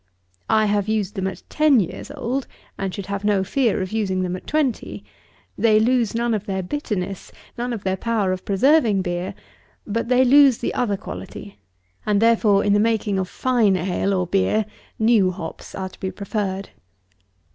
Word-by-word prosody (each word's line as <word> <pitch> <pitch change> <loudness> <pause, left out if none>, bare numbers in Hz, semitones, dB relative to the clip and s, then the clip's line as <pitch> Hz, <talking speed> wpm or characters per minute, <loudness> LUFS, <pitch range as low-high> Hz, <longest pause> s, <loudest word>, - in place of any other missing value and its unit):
I 215 0 +4
have 205 -1 0
used 210 -2 -1
them 190 -3 -2
at 190 - -6
ten 305 -5 +4
years 180 - -4
old, 270 -2 -3 0.3
and 195 -1 -3
should 195 +1 -6
have 200 0 -4
no 205 -2 +2
fear 225 -1 +1
of 185 - -6
using 195 -4 -1
them 180 0 -2
at 185 - -10
twenty. 300 -6 -1 0.5
They 215 -2 +4
lose 235 -1 +2
none 235 0 0
of 210 0 -3
their 190 -1 -2
bitterness; 195 - -4 0.2
none 245 +1 -3
of 225 -4 -4
their 190 0 -1
power 215 -3 0
of 185 0 -3
preserving 215 -1 +3
beer; 175 0 -3 0.5
but 230 +2 -2
they 255 +1 +4
lose 275 -1 +6
the - - -3
other 205 -5 0
quality; 100 - -9 0.4
and 205 -1 +1
therefore, 220 -3 +4
in 205 - +2
the 205 - +4
making 215 -3 +1
of 185 -1 -2
fine 235 -6 +2
ale, 185 +2 -1
or 180 -1 0
beer, 195 +4 +1 0.3
new 220 -4 +4
hops 170 -3 -7
are 190 -1 -4
to - - -18
be 190 - -3
preferred. 195 -1 -3
205 Hz, 180 wpm, -22 LUFS, 190-230 Hz, 0.5 s, lose